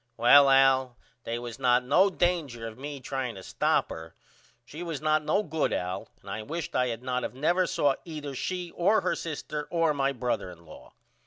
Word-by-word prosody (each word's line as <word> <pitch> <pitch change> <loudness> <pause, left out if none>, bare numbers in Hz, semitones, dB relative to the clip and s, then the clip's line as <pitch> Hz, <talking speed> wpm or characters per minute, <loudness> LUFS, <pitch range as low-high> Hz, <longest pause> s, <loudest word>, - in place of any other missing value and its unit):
Well 135 +4 +7
Al 135 -2 +4 0.3
they 115 - -2
was 120 0 -7
not 125 -1 +3
no 180 +10 +4
danger 165 -11 -1
of 110 - -8
me 140 +3 -7
trying 130 -3 -4
to 95 - -10
stop - - 0
her. - - -9 0.5
She 150 +6 -9
was 165 -5 -4
not 155 0 +1
no 200 +7 +1
good 160 -3 -1
Al 90 0 -3
and - - -9
I 110 - -4
wisht 165 +8 -5
I 125 0 +2
had 115 0 -4
not 125 -1 -2
of - - -5
never 175 +7 +2
saw 145 -2 +2
either 150 -4 -6
she 180 +5 -4
or 205 +5 +2
her - - 0
sister 150 -2 -5
or 165 -2 +2
my 140 -1 +1
brother 125 -7 -2
in 85 -1 -14
law. 80 - -14
140 Hz, 200 wpm, -28 LUFS, 125-160 Hz, 0.5 s, Well